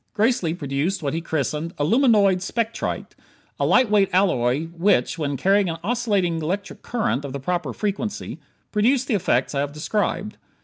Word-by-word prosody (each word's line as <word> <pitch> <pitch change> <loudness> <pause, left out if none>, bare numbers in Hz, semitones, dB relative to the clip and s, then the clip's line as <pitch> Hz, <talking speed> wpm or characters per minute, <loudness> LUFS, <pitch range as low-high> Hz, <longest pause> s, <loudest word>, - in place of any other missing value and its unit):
Gracely 210 -7 +1
produced 150 +5 -2
what 140 - -1
he 165 - -2
christened 160 +1 -2
"aluminoid 200 - +3
spectrite" 230 +3 -3 0.5
a - - +2
light 255 -1 +5
weight 205 -2 +3
alloy 150 -8 +2
which, 175 +1 +1
when 145 -3 -1
carrying 195 +5 +3
an 165 - -3
oscillating 200 -7 0
electronic 190 +6 -4
current 220 - -1
of 140 -2 -6
the 140 - -4
proper 175 0 -2
frequency, 210 - -3 0.3
produced 245 +5 +2
the 250 - 0
effects 140 - +1
I 140 - -1
have 145 0 -2
described. 205 +5 -2
180 Hz, 160 wpm, -23 LUFS, 150-210 Hz, 0.5 s, light